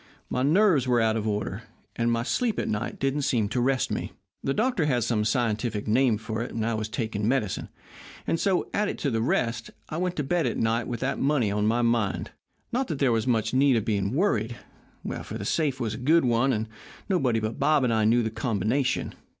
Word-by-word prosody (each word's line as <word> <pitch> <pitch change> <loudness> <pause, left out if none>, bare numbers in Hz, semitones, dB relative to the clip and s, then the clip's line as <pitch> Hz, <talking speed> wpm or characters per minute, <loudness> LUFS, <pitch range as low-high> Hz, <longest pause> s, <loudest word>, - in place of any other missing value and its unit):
My 125 - 0
nerves 155 - +4
were 120 -1 +3
out 110 -1 +2
of 110 -1 -2
order, 105 -1 -2 0.3
and 120 0 +1
my 115 0 0
sleep 230 - 0
at - - -1
night 105 +1 -2
didn't 135 +2 0
seem 115 -6 +1
to 125 +2 0
rest 130 +1 +1
me. - - -3 0.3
The 135 - 0
doctor 215 - +1
had 125 -5 +1
some 110 -2 +1
scientific 110 -1 -1
name 120 0 +3
for 110 +1 -4
it, 120 - -4
and 110 -1 -1
I 115 - 0
was 110 0 -3
taking 110 -2 -2
medicine. 115 -6 -1 0.6
And 165 - 0
so, 190 -3 +1
added 210 0 0
to 140 - -1
the 115 -1 0
rest, 115 -1 0 0.2
I 155 - -4
went 180 0 -1
to 150 - -1
bed 165 +1 +1
at 120 - -2
night 115 +1 0
with 120 -2 -4
that 135 +1 -1
money 135 -7 +2
on 105 +1 +1
my 120 +2 +2
mind. 115 -4 0 0.4
Not 255 +2 0
that 155 - -3
there 135 -2 +2
was 115 +2 0
much 110 -2 +1
need 135 0 +4
of 110 - 0
being 100 +1 0
worried, 120 - +1 0.6
for - - -6
the - - -6
safe 145 -5 0
was 115 -4 -2
a - - -5
good 155 +4 +3
one, 120 +3 +2
and 110 -2 -1 0.4
nobody 135 - +1
but 110 +1 -4
Bob 150 -3 +3
and 120 -2 +2
I 110 -1 +2
knew 120 +2 +4
the 110 - -2
combination. 125 +3 -1
120 Hz, 225 wpm, -26 LUFS, 110-135 Hz, 0.6 s, nerves